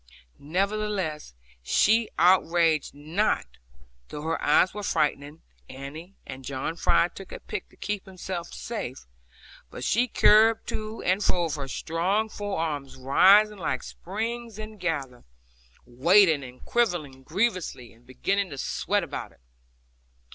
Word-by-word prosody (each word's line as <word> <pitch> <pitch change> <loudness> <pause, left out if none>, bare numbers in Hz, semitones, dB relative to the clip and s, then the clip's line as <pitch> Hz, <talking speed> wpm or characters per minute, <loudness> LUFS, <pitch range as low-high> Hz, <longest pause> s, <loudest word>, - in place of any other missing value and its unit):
Nevertheless, 190 - -2 0.3
she 215 - +3
outraged 170 -4 +3
not, 160 +9 0 0.6
though 150 - -7
her 165 +1 -2
eyes 155 +5 +4
were 210 - -5
frightening 150 -4 -1 0.3
Annie, 155 +8 -9
and 130 +1 -8
John 135 +4 -3
Fry 170 - +3
took 195 - -11
a - - -7
pick - - -6
to - - -22
keep 210 -2 -4
him 190 -1 -13
safe; 175 - -5 0.6
but - - -8
she 240 +4 +2
curbed 220 0 +5
to 215 +1 -5
and 190 +3 +1
fro 175 -2 +2
with 165 -3 -2
her 140 -2 -4
strong 185 +10 -1
forearms 160 -10 -3
rising 195 +10 +5
like 130 -7 -2
springs 225 +3 -5
ingathered, 170 - -4 0.6
waiting 160 +4 +4
and 125 -1 -12
quivering 175 - 0
grievously, 180 - -2
and 115 +2 -24
beginning 195 +10 -1
to 140 - -8
sweat - - -1
about - - -6
it. 60 - -26
175 Hz, 130 wpm, -26 LUFS, 145-210 Hz, 0.6 s, curbed